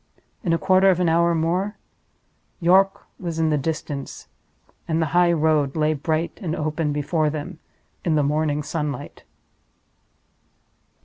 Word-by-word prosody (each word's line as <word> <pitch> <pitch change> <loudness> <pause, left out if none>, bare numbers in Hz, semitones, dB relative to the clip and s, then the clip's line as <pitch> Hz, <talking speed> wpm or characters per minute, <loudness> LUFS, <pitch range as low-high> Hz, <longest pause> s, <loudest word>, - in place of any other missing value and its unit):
In 175 - 0
a 165 - +3
quarter 190 +2 +4
of 180 -2 +3
an 180 - +2
hour 170 +1 +3
more 180 +6 -1 0.8
York 190 +2 +3 0.2
was 170 -3 -4
in 160 -1 +1
the - - +3
distance, 145 -2 -5 0.6
and 160 0 0
the 160 - +2
highroad 160 -5 +3
lay 155 0 +2
bright 155 +3 -2
and 165 -4 -2
open 155 0 -1
before 150 +2 0
them 150 +1 -6 0.4
in 165 -3 +1
the 150 - +3
morning 150 +1 0
sunlight. 150 -3 -4
160 Hz, 135 wpm, -23 LUFS, 150-170 Hz, 0.8 s, quarter